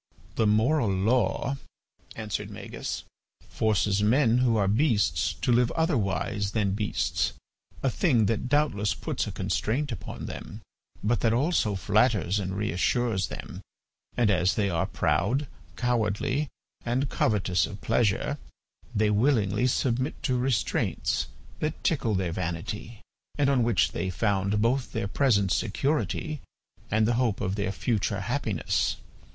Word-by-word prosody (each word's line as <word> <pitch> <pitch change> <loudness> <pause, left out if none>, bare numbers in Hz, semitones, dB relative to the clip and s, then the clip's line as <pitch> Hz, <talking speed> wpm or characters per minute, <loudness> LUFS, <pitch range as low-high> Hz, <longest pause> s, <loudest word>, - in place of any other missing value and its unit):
"The 110 - +2
moral 115 +4 +3
law," 115 +7 +1 0.6
answered 110 -3 -4
Magis, - - -5 0.5
"forces 105 -2 +1
men 120 +2 +4
who 120 -3 +3
are 100 -2 +2
beasts 110 0 +2
to - - -1
live 120 0 +4
otherwise 105 - 0
than 105 -3 +1
beasts, 105 +2 0 0.5
a 135 - +3
thing 125 - +3
that 115 +4 -1
doubtless 145 -9 +1
puts - - -3
a - - -3
constraint 140 +6 -1
upon 115 - -6
them, - - -7 0.4
but 110 +1 +2
that 115 -1 +2
also 125 - +1
flatters 100 -1 +2
and 95 -1 -3
reassures 105 +1 0
them; - - -8 0.6
and 115 -4 +4
as 90 -1 +2
they 100 -3 +1
are 85 -1 0
proud, 115 - +1 0.3
cowardly, 125 +4 0 0.3
and 125 +4 0
covetous 95 -5 +1
of 105 - -9
pleasure, 115 -3 +1 0.6
they 105 0 +3
willingly 105 -1 +2
submit 130 +2 -1
to 130 - +1
restraints 125 -3 0 0.3
that 155 +1 -3
tickle 130 -9 +1
their 95 -2 0
vanity 90 +7 -4 0.4
and 140 -1 +3
on 130 -3 +3
which 115 -5 +2
they 95 +2 -2
found 100 +2 +1
both 125 +3 0
their - - -1
present 100 -5 +2
security 145 +7 -1 0.5
and 110 +1 +2
the 120 - +2
hope 115 -6 +1
of 95 -3 -1
their 100 -1 -1
future 100 +1 -1
happiness. 115 -4 0
110 Hz, 135 wpm, -27 LUFS, 100-125 Hz, 0.6 s, men